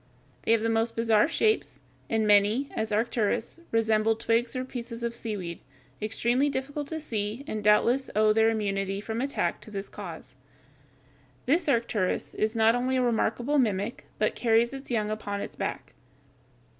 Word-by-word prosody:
They - - 0
have 230 - +3
the - - +1
most 225 +1 0
bizarre 225 0 +3
shapes, 435 +7 0 0.3
and 220 -1 +1
many, 210 +6 +4
as 220 0 -2
Arcturus, 230 +4 0
resemble 225 -1 +2
twigs 230 +2 0
or 255 0 -2
pieces 235 -2 -7
of 235 0 -1
seaweed, 200 -8 -5 0.4
extremely 235 +6 +1
difficult 285 +2 -3
to 320 +1 -4
see 220 -3 -3
and 215 -5 -4
doubtless 235 +5 +3
owe 215 0 +4
their 225 +1 +4
immunity 195 -3 -1
from 220 +3 -3
attack 275 +1 -1
to - - -12
this 200 -1 -6
cause. 165 - -9 1.1
This 320 +3 +2
Arcturus 230 -7 0
(Fig. - - -11
142) - - +1
is 220 +2 0
not 225 0 +5
only 250 +2 0
a 255 - +2
remarkable 240 +4 +1
mimic, 210 -2 -1
but - - +1
carries 235 +1 +2
its 270 0 -8
young 215 -3 0
upon 205 -2 -3
its - - -6
back. - - -4
225 Hz, 170 wpm, -27 LUFS, 215-245 Hz, 1.1 s, not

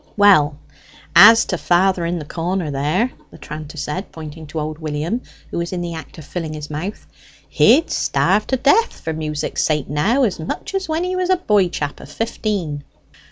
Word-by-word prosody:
"Well, 155 -8 +5 0.6
as 225 +5 +9
to 180 - -3
father 180 -1 +2
in 175 +1 -1
the 155 - -6
corner 170 0 -2
there," 155 - 0 0.2
the - - -14
tranter 150 +1 -8
said, 170 +6 -4
pointing 160 0 -9
to 155 +2 -5
old 155 +1 -4
William, 155 +9 -2 0.3
who - - -2
was 170 0 -3
in 180 - -2
the 170 -1 -4
act 160 -1 -9
of 155 - -10
filling 160 -1 -5
his 150 0 -7
mouth; 175 +8 -5 0.4
"he'd 315 +5 +4
starve 180 +10 +1
to 265 - +1
death 425 - +3
for 160 - -4
music's 155 -1 -2
sake 150 -3 0
now, 205 - +2
as 210 -9 0
much 160 - -5
as 385 -3 -2
when 320 +2 0
he 365 +1 -2
was 365 0 -1
a 370 - +4
boy 210 - +2
chap 145 -4 -4
of 140 - -12
fifteen." 195 -7 -3
170 Hz, 195 wpm, -20 LUFS, 150-210 Hz, 0.6 s, as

